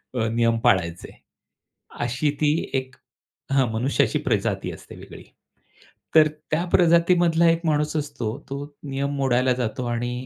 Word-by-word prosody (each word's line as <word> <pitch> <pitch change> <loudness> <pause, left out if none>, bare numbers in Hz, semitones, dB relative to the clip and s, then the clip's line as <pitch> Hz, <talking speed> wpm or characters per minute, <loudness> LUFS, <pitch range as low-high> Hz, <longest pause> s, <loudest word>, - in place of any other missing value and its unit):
अ, 115 -3 0
नियम 115 0 +1
पाळायचे, 85 -3 +1 0.9
अशी 130 +5 0
ती 150 -1 +3 0.2
एक 130 0 -3 0.6
हं 135 -3 +3
मनुष्याची 125 +2 +1
प्रजाती - - -1
असते - - -12
वेगळी. - - -12 0.9
तर 155 -1 +7 0.2
त्या 165 +3 +1
प्रजातीमधला 170 -1 +4
एक 165 0 +1
माणूस 150 0 0
असतो. 125 -5 -4
तो 140 +1 -5 0.2
नियम 140 0 -3
मोडायला 130 -1 +2
जातो 125 0 -3
आणि 120 +1 -2
135 Hz, 130 wpm, -23 LUFS, 120-155 Hz, 0.9 s, तर